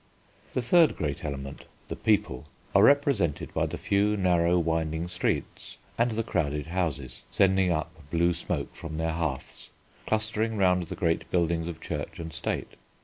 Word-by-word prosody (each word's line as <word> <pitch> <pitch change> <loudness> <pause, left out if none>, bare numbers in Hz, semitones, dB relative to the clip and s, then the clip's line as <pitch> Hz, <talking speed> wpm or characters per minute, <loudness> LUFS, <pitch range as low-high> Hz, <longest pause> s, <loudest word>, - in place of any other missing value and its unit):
The 130 - -1
third 160 +6 +5
great 75 -3 -3
element, 70 -2 -6 0.2
the - - -4
People, 100 - +1 0.3
are - - +6
represented 140 - +3
by - - +1
the - - -5
few 105 +1 +1
narrow, 90 -2 +3
winding 80 0 0
streets 90 0 -3 0.2
and 120 +1 +2
the 115 0 -1
crowded 75 -9 -1
houses, 80 -7 -3
sending 95 -1 +3
up 80 -2 -4
blue 85 +2 +2
smoke 85 - -3
from 80 -1 -7
their 80 0 0
hearths, 80 -5 -4 0.4
clustering 110 0 0
round 90 -3 +3
the - - -5
great 80 -1 0
buildings 85 -1 +1
of 85 -2 -6
Church 75 -2 -5
and 80 -1 -7
State. - - -3
85 Hz, 155 wpm, -28 LUFS, 80-100 Hz, 0.4 s, are